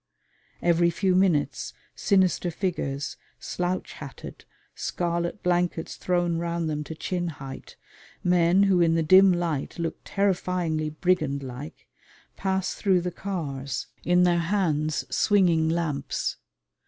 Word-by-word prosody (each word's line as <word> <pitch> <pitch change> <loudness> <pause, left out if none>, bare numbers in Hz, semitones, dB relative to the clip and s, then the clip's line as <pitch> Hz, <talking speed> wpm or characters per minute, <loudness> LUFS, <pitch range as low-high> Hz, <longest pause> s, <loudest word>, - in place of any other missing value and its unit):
Every 170 0 +4
few 185 +2 +1
minutes 180 -6 +1 0.2
sinister 190 -3 +2
figures, 160 -6 -3 0.2
slouch 180 +1 -3
hatted, 140 -3 -10 0.3
scarlet 170 +2 -2
blankets 175 -2 0
thrown 175 -2 0
round 170 -1 -2
them 150 -1 -2
to 160 - -7
chin 175 +2 -2
height, 135 -4 -8 0.5
men 180 +2 +4
who 190 -3 +4
in 165 -1 +4
the 165 - +2
dim 185 +4 +7
light 170 -5 -2
look 165 -1 -3
terrifyingly 180 -5 0
brigand 155 -4 0
like, 135 +5 -8 0.5
pass 190 -1 -1
through 190 -3 +2
the 180 +1 -3
cars, 140 - -4 0.2
in 180 0 +4
their 175 -1 +3
hands 165 -4 0
swinging 175 -6 +3
lamps. 160 -5 -2
170 Hz, 120 wpm, -26 LUFS, 155-180 Hz, 0.5 s, dim